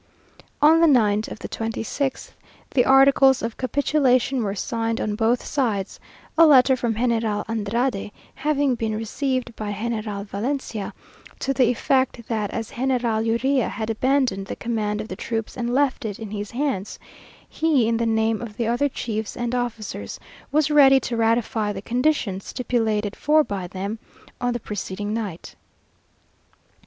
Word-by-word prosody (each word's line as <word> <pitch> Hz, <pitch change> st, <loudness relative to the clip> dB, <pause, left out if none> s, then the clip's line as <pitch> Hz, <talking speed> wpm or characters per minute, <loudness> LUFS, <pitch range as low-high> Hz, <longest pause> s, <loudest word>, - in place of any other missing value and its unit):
On 320 Hz, +2 st, +7 dB
the 335 Hz, -, +6 dB
night 215 Hz, -6 st, +3 dB
of -, -, -7 dB
the -, -, -7 dB
twenty 225 Hz, 0 st, -3 dB
sixth, 270 Hz, +4 st, -3 dB, 0.4 s
the 250 Hz, -, +3 dB
articles 270 Hz, -1 st, +5 dB
of 230 Hz, -1 st, -3 dB
capitulation 265 Hz, -1 st, +1 dB
were 200 Hz, -2 st, -2 dB
signed 225 Hz, +2 st, -2 dB
on 210 Hz, -, -1 dB
both 225 Hz, +3 st, +1 dB
sides; 220 Hz, -9 st, -1 dB, 0.4 s
a 330 Hz, -, +9 dB
letter 265 Hz, -2 st, +6 dB
from 240 Hz, -3 st, -1 dB
General 225 Hz, -3 st, 0 dB
Andrade 225 Hz, 0 st, -1 dB, 0.2 s
having 290 Hz, -3 st, +1 dB
been 225 Hz, -2 st, -2 dB
received 245 Hz, +2 st, -2 dB
by 210 Hz, -1 st, -4 dB
General 215 Hz, -1 st, -3 dB
Valencia, 220 Hz, +1 st, -3 dB, 0.5 s
to 270 Hz, -, -1 dB
the 255 Hz, -3 st, +3 dB
effect 250 Hz, -1 st, 0 dB
that 215 Hz, -3 st, -1 dB
as 225 Hz, -2 st, -5 dB
General 245 Hz, -3 st, 0 dB
Urrea 245 Hz, +3 st, +1 dB
had 220 Hz, +1 st, -3 dB
abandoned 250 Hz, -5 st, +1 dB
the -, -, -4 dB
command 215 Hz, -3 st, -2 dB
of 215 Hz, -, -7 dB
the 185 Hz, -, -6 dB
troops 225 Hz, +2 st, -4 dB
and 240 Hz, -1 st, -2 dB
left 270 Hz, 0 st, +1 dB
it 210 Hz, -3 st, -4 dB
in 220 Hz, -3 st, -8 dB
his 205 Hz, -1 st, -4 dB
hands, 245 Hz, -7 st, -2 dB, 0.5 s
he, 300 Hz, -8 st, +2 dB
in 230 Hz, 0 st, +1 dB
the 230 Hz, 0 st, 0 dB
name 220 Hz, 0 st, +1 dB
of 225 Hz, -3 st, -8 dB
the 235 Hz, -, 0 dB
other 245 Hz, +5 st, +1 dB
chiefs 220 Hz, -4 st, -4 dB
and 240 Hz, 0 st, -2 dB
officers, 225 Hz, -, -4 dB, 0.3 s
was 300 Hz, 0 st, +2 dB
ready 270 Hz, -2 st, +7 dB
to 235 Hz, -, -3 dB
ratify 225 Hz, -2 st, +1 dB
the 195 Hz, -, -5 dB
conditions 235 Hz, -4 st, 0 dB
stipulated 220 Hz, -5 st, -1 dB
for 305 Hz, +1 st, +3 dB
by 195 Hz, -8 st, -4 dB
them 195 Hz, +4 st, -5 dB, 0.4 s
on 245 Hz, 0 st, +1 dB
the 240 Hz, -, -3 dB
preceding 205 Hz, -1 st, -4 dB
night. 205 Hz, -7 st, -5 dB
230 Hz, 160 wpm, -23 LUFS, 215-260 Hz, 0.5 s, a